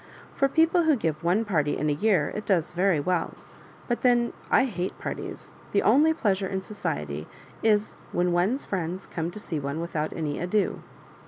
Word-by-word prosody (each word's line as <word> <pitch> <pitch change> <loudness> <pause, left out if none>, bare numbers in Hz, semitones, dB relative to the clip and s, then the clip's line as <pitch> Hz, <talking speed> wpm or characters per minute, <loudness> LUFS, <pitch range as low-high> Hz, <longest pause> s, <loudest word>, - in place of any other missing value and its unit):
For 275 - +2
people 330 +3 +3
who 315 -2 +5
give 160 - -2
one 185 +7 +2
party 150 -8 +1
in - - -2
the 150 - +2
year 180 -1 +2
it 210 - -4
does 175 -6 +2
very 180 -2 +2
well 175 +3 -1 0.3
— - - -22
but 240 - -1
then 240 -1 +3 0.2
1 270 - +5
hate 185 -7 -3
parties; - - -6 0.2
the - - +3
only 310 +4 +5
pleasure 200 -10 0
in 190 0 -3
society 75 - -4 0.3
is, 215 -1 +2 0.2
when 175 0 +1
one's 190 +11 +1
friends 185 0 -3
come 165 -1 -3
to 190 - -8
see 165 -6 -3
one 140 +2 -3
without 160 -2 -2
any 150 -3 -3
ado." 185 +4 0
185 Hz, 185 wpm, -26 LUFS, 160-220 Hz, 0.3 s, who